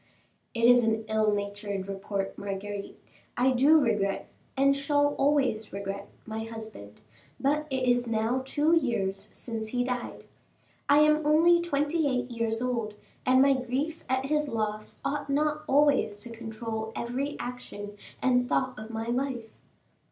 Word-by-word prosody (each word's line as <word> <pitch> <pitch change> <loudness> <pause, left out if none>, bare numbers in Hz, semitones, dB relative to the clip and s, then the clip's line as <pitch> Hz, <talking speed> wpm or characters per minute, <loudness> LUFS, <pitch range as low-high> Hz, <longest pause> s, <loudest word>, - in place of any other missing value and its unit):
"It 230 - -1
is 245 +1 +7
an 220 0 0
ill 215 -1 +2
natured 205 -1 -3
report, 195 0 -3
Marguerite. 200 0 -5 0.4
I 255 +2 +4
do 280 +5 +6
regret, 210 -7 0 0.3
and 275 +1 +4
shall 290 +1 +2
always 265 -7 +1
regret, 200 0 -5 0.2
my 220 0 -4
husband; 220 - -9 0.4
but 295 +2 +1
it 260 -1 -1
is 245 0 +2
now 230 +3 0
two 295 +4 +1
years 210 -9 -1
since 225 -2 -5
he 245 +2 0
died. 250 -1 -4 0.7
I 290 +1 +7
am 305 0 +4
only 330 +3 +5
twenty 300 -1 0
eight 250 -2 -1
years 230 0 -1
old, 230 -4 -2 0.3
and 260 +1 +6
my 275 0 +5
grief 270 +6 -2
at 260 +1 +1
his 300 +1 0
loss 215 -2 -3
ought 285 0 -2
not 300 +2 +1
always 275 -7 +3
to 235 - -9
control 225 -1 -5
every 265 +5 -3
action 205 -4 -7 0.3
and 250 -1 +3
thought 260 -3 0
of 215 +1 -8
my 225 0 -4
life. 240 -2 -2
245 Hz, 150 wpm, -28 LUFS, 220-275 Hz, 0.7 s, is